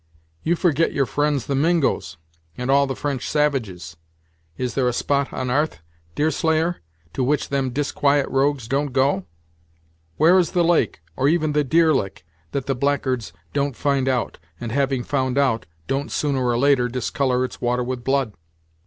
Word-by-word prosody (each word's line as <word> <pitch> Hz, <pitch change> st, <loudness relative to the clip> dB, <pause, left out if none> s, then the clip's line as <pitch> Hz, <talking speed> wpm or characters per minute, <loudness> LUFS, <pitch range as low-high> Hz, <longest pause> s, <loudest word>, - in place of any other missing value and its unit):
"You 170 Hz, -, +1 dB
forget 165 Hz, -2 st, +1 dB
your 140 Hz, -, +2 dB
friends 145 Hz, 0 st, 0 dB
the 140 Hz, -, -2 dB
Mingos, 145 Hz, -, +1 dB, 0.4 s
and 125 Hz, +2 st, -1 dB
all 140 Hz, 0 st, +4 dB
the 135 Hz, -, -3 dB
French 140 Hz, -3 st, -3 dB
savages. 110 Hz, -, -1 dB, 0.6 s
Is 125 Hz, -2 st, -2 dB
there 130 Hz, -2 st, +1 dB
a 125 Hz, -, +1 dB
spot 140 Hz, +3 st, 0 dB
on 130 Hz, -1 st, -3 dB
'arth, 150 Hz, -, 0 dB, 0.4 s
Deerslayer, 160 Hz, +3 st, +1 dB, 0.4 s
to 130 Hz, -, -1 dB
which 145 Hz, +3 st, 0 dB
them 135 Hz, -2 st, 0 dB
disquiet 140 Hz, +1 st, +1 dB
rogues 135 Hz, -3 st, 0 dB
don't 140 Hz, +1 st, -1 dB
go? 130 Hz, -8 st, +1 dB, 0.9 s
Where 175 Hz, +4 st, +6 dB
is 175 Hz, -, 0 dB
the 175 Hz, -, +3 dB
lake, 165 Hz, -, +1 dB
or 135 Hz, -, +1 dB
even 155 Hz, 0 st, +2 dB
the 150 Hz, 0 st, +2 dB
deer 160 Hz, +3 st, +4 dB
lick, 95 Hz, -, -2 dB, 0.3 s
that 135 Hz, -2 st, -2 dB
the 135 Hz, -, 0 dB
blackguards 130 Hz, -5 st, -1 dB, 0.2 s
don't 140 Hz, -2 st, 0 dB
find 140 Hz, -1 st, +1 dB
out, 125 Hz, -2 st, -1 dB, 0.2 s
and 120 Hz, -2 st, -5 dB
having 135 Hz, -1 st, 0 dB
found 130 Hz, -1 st, -1 dB
out, 130 Hz, -5 st, +1 dB, 0.2 s
don't, 135 Hz, +1 st, -2 dB
sooner 140 Hz, -3 st, 0 dB
or 120 Hz, -1 st, +1 dB
later, 135 Hz, -1 st, +3 dB
discolour 125 Hz, +1 st, 0 dB
its -, -, -9 dB
water 125 Hz, 0 st, +1 dB
with 125 Hz, 0 st, -4 dB
blood." 135 Hz, -5 st, 0 dB
135 Hz, 170 wpm, -22 LUFS, 125-145 Hz, 0.9 s, Where